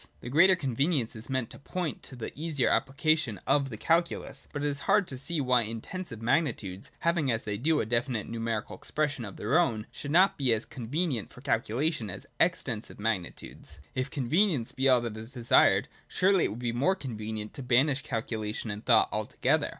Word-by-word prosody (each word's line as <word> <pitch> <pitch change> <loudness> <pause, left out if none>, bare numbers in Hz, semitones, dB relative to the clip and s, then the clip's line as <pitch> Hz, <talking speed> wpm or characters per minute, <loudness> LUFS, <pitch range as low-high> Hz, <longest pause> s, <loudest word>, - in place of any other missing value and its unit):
This 120 - -7
greater 180 +7 +6
convenience 135 -4 0
is 110 +3 -9
meant 130 -3 -1
to - - -7
point 170 +1 -4
to 135 - -8
the 120 - -5
easier 150 -4 0
application 140 -4 +1
of 140 -2 +2
the 110 - -6
calculus: 165 -2 0
but 145 -1 -4
it - - +1
is 140 -1 -1
hard 205 -2 +5
to 130 - -5
see 165 +4 -1
why 125 -3 +3
Intensive 115 - -5
magnitudes, 115 - 0
having, 165 -5 +2
as 115 0 -1
they 105 -1 -3
do, 150 +8 +1
a - - 0
definite 120 0 -1
numerical 115 -2 -3
expression 145 -4 -2
of 100 - -8
their 140 +11 +2
own, 115 -11 +1
should 145 - -7
not 180 +4 +4
be 130 -4 +3
as 110 0 -2
con 120 -3 -8
venient 145 - -1
for - - -14
calculation 130 0 0
as 95 +1 -7
Extensive 125 -13 0
magnitudes. 105 -5 -4 0.2
If 130 +1 -2
con 135 -4 -3
venience 160 - +1
be 135 0 +3
all 125 -2 +5
that 115 -3 -4
is 110 +4 -5
desired, 120 -2 +4 0.2
surely 190 0 +3
it - - +2
would 110 - -6
be 120 -1 -2
more 140 +11 +2
con 135 - -6
venient 110 0 -5
to - - -7
banish 130 +3 +3
calculation 110 -2 -3
and 105 +1 -6
thought - - +5
altogether. - - 0
130 Hz, 200 wpm, -29 LUFS, 115-155 Hz, 0.2 s, greater